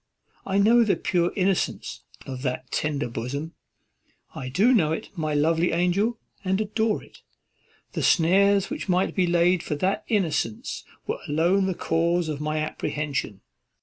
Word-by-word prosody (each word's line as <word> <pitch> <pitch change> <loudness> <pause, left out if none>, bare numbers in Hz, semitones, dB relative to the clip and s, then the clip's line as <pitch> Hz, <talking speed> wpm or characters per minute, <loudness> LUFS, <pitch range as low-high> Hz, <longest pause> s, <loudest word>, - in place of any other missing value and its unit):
I 195 0 0
know 230 +4 +5
the 215 - +2
pure 175 -1 0
innocence 190 -2 -1 0.2
of 130 -2 -6
that 130 -1 -3
tender 150 -2 -1
bosom, 130 +7 -5 0.8
I 130 - -6
do 210 - +4
know 160 -10 +3
it, 160 - -4
my 155 -3 -2
lovely 165 +3 +2
angel, 185 +7 +1 0.3
and 190 +1 0
adore 215 +1 0
it. - - -18 0.7
The - - -3
snares 195 +5 +4
which 295 -9 -5
might 185 +1 +2
be 185 -2 +1
laid 175 +1 +3
for 150 - -3
that 185 +7 0
innocence 165 - -1 0.2
were - - -3
alone 175 +6 +2
the 190 - -1
cause 170 +1 0
of 150 -1 -4
my 155 +1 -1
apprehension. 145 -8 -3
170 Hz, 150 wpm, -25 LUFS, 150-195 Hz, 0.8 s, know